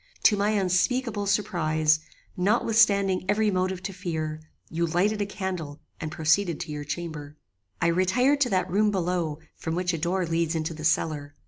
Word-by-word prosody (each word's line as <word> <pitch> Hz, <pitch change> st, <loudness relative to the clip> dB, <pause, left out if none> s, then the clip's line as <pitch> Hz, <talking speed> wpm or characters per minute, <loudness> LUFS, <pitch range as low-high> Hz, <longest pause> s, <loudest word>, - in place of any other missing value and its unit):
To 210 Hz, -, +6 dB
my 205 Hz, +1 st, +1 dB
unspeakable 205 Hz, +3 st, +1 dB
surprize, 155 Hz, -7 st, +2 dB, 0.4 s
notwithstanding 200 Hz, -1 st, +3 dB
every 210 Hz, 0 st, +2 dB
motive 185 Hz, 0 st, -1 dB
to 195 Hz, +1 st, -4 dB
fear, 160 Hz, -4 st, -4 dB, 0.3 s
you 170 Hz, +1 st, -1 dB
lighted 200 Hz, +6 st, +1 dB
a 200 Hz, -, -1 dB
candle 180 Hz, -7 st, -5 dB, 0.2 s
and 155 Hz, -1 st, -4 dB
proceeded 160 Hz, +2 st, +1 dB
to -, -, -5 dB
your 150 Hz, 0 st, -4 dB
chamber. 150 Hz, -1 st, -6 dB, 0.4 s
"I -, -, 0 dB
retired 190 Hz, +12 st, +2 dB
to 250 Hz, -, +3 dB
that 185 Hz, -3 st, +1 dB
room 205 Hz, +4 st, +2 dB
below 175 Hz, -5 st, -1 dB, 0.2 s
from 160 Hz, 0 st, -4 dB
which 180 Hz, 0 st, 0 dB
a 165 Hz, -, -2 dB
door 180 Hz, +3 st, 0 dB
leads 165 Hz, 0 st, 0 dB
into 160 Hz, 0 st, -2 dB
the 155 Hz, 0 st, -9 dB
cellar. 150 Hz, -2 st, 0 dB
180 Hz, 165 wpm, -26 LUFS, 160-200 Hz, 0.4 s, To